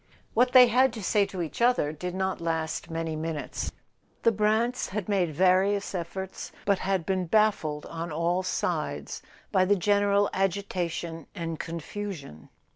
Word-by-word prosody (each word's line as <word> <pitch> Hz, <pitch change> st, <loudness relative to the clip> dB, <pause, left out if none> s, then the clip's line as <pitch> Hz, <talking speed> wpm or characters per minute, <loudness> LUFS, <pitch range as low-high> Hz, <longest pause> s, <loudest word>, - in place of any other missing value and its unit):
What 250 Hz, +2 st, +3 dB
they 255 Hz, -1 st, +10 dB
had 250 Hz, +2 st, +4 dB
to 220 Hz, -, -6 dB
say 200 Hz, +1 st, +2 dB
to 190 Hz, -3 st, -4 dB
each 160 Hz, +6 st, -6 dB
other 240 Hz, -11 st, +3 dB
did 180 Hz, +3 st, -5 dB
not 190 Hz, -2 st, -1 dB
last 160 Hz, 0 st, -2 dB
many 165 Hz, -1 st, -3 dB
minutes. 155 Hz, -1 st, -3 dB, 0.5 s
The 230 Hz, -, +5 dB
Brants 220 Hz, +4 st, +1 dB
had 205 Hz, 0 st, -3 dB
made 190 Hz, -5 st, +1 dB
various 190 Hz, +5 st, +2 dB
efforts, 190 Hz, +2 st, -5 dB
but 200 Hz, -2 st, +2 dB
had 190 Hz, -3 st, 0 dB
been 185 Hz, -1 st, 0 dB
baffled 165 Hz, -7 st, +2 dB
on 165 Hz, 0 st, -5 dB
all 170 Hz, +4 st, +1 dB
sides 185 Hz, -, -2 dB, 0.3 s
by 190 Hz, -3 st, +4 dB
the 200 Hz, +2 st, +3 dB
general 205 Hz, +1 st, +3 dB
agita¬ 190 Hz, -2 st, 0 dB
tion 165 Hz, -2 st, -6 dB
and 165 Hz, -2 st, -4 dB
confusion. 165 Hz, -, -6 dB
185 Hz, 155 wpm, -27 LUFS, 165-205 Hz, 0.5 s, they